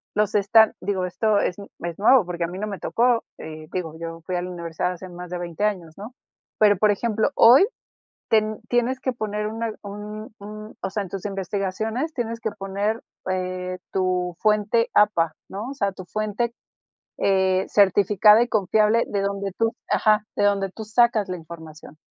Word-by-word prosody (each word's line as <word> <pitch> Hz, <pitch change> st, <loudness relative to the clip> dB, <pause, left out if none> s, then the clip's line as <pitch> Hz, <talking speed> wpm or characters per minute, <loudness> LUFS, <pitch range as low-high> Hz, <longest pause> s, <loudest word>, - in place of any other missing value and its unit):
los 210 Hz, 0 st, +1 dB
están, 215 Hz, +2 st, +5 dB
digo, 190 Hz, -1 st, -1 dB
esto 210 Hz, +3 st, +1 dB
es 180 Hz, -, 0 dB, 0.2 s
es 170 Hz, 0 st, -5 dB
nuevo, 225 Hz, +1 st, +6 dB
porque 175 Hz, -1 st, -3 dB
a -, -, 0 dB
mí 180 Hz, +2 st, -7 dB
no 210 Hz, -, -2 dB
me 200 Hz, -2 st, -5 dB
tocó, 240 Hz, 0 st, +2 dB
eh, 155 Hz, 0 st, -9 dB
digo, 170 Hz, -4 st, -3 dB
yo 165 Hz, 0 st, -6 dB
fui 185 Hz, -, -3 dB
a 175 Hz, -, 0 dB
la 180 Hz, -, -5 dB
universidad 170 Hz, 0 st, -3 dB
hace 180 Hz, +1 st, -9 dB
más 175 Hz, 0 st, -9 dB
de 180 Hz, -, -4 dB
20 175 Hz, +2 st, -5 dB
años, 180 Hz, -7 st, -2 dB
¿no? 210 Hz, +5 st, -9 dB, 0.5 s
Pero, 205 Hz, -2 st, +5 dB
por 210 Hz, +2 st, +4 dB
ejemplo, 220 Hz, +4 st, 0 dB
hoy 250 Hz, +11 st, +8 dB, 0.6 s
ten 215 Hz, -1 st, +1 dB
tienes 245 Hz, +2 st, +1 dB
que 260 Hz, -, -1 dB
poner 210 Hz, -3 st, -3 dB
una 225 Hz, +1 st, -3 dB
un 210 Hz, +2 st, -8 dB
un, 215 Hz, +1 st, -9 dB
o -, -, -2 dB
sea, 205 Hz, +1 st, -2 dB
en 190 Hz, -, -9 dB
tus 195 Hz, +1 st, -5 dB
investigaciones 205 Hz, -, -3 dB
tienes 230 Hz, -2 st, -3 dB
que 220 Hz, -, -2 dB
poner, 200 Hz, +3 st, -2 dB, 0.3 s
eh, 185 Hz, 0 st, -3 dB
tu 180 Hz, -2 st, 0 dB
fuente 215 Hz, +2 st, +2 dB
APA, 170 Hz, -6 st, +3 dB
¿no? 205 Hz, +5 st, -6 dB
O -, -, -6 dB
sea, 200 Hz, -8 st, -1 dB
tu 185 Hz, 0 st, -10 dB
fuente, 215 Hz, +5 st, -2 dB, 0.6 s
eh, 190 Hz, -1 st, +2 dB
certificada 205 Hz, +2 st, +5 dB
y 240 Hz, -, +2 dB
confiable, 215 Hz, +1 st, +2 dB
de 200 Hz, -, -1 dB
donde 200 Hz, 0 st, -2 dB
tú 225 Hz, 0 st, +1 dB, 0.2 s
ajá, 215 Hz, -1 st, +3 dB
de -, -, +2 dB
donde 200 Hz, -1 st, +1 dB
tú 220 Hz, +3 st, -8 dB
sacas 220 Hz, -1 st, +3 dB
la 185 Hz, -, -3 dB
información. 160 Hz, -2 st, -12 dB
205 Hz, 185 wpm, -23 LUFS, 185-220 Hz, 0.6 s, hoy